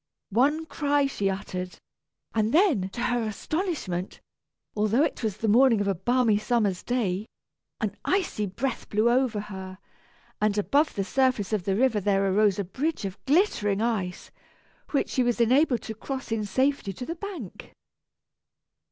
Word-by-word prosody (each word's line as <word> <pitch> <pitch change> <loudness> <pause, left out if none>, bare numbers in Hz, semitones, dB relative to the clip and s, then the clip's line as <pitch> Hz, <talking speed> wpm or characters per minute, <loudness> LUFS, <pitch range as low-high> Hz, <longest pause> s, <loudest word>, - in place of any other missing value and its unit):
One 290 +9 +2
cry 290 -2 +1
she 205 -8 -1
uttered, 185 -1 -5 0.6
and 220 0 +1
then 305 - +3
to 235 +5 -6
her 245 0 +1
astonishment, 220 - -3 0.6
although 215 +6 +2
it - - -2
was 215 -4 -2
the 220 - -2
morning 235 +1 +5
of 205 - 0
a 195 - +2
balmy 225 +3 +2
summer's 215 -4 0
day, 215 -5 -1 0.5
an 210 -3 -2
icy 360 - 0
breath 235 +6 -4
blew 215 +3 +3
over 245 -4 +2
her, 190 -2 -8 0.6
and 210 -1 +2
above 285 +9 +2
the 195 - 0
surface 250 -2 +1
of 200 -5 -1
the 195 - +1
river 235 -1 +2
there 195 0 +2
arose 205 -1 +3
a 200 - -1
bridge 275 - -2
of 190 -1 -7
glittering 265 - +2
ice, 215 -6 -2 0.6
which 280 - 0
she 260 - +1
was 240 -1 +1
enabled 250 +2 +3
to 220 - -5
cross 265 +3 -6
in 220 -2 0
safety 260 -1 0
to 250 - -7
the 330 - -3
bank. 345 - -8
225 Hz, 160 wpm, -26 LUFS, 200-265 Hz, 0.6 s, morning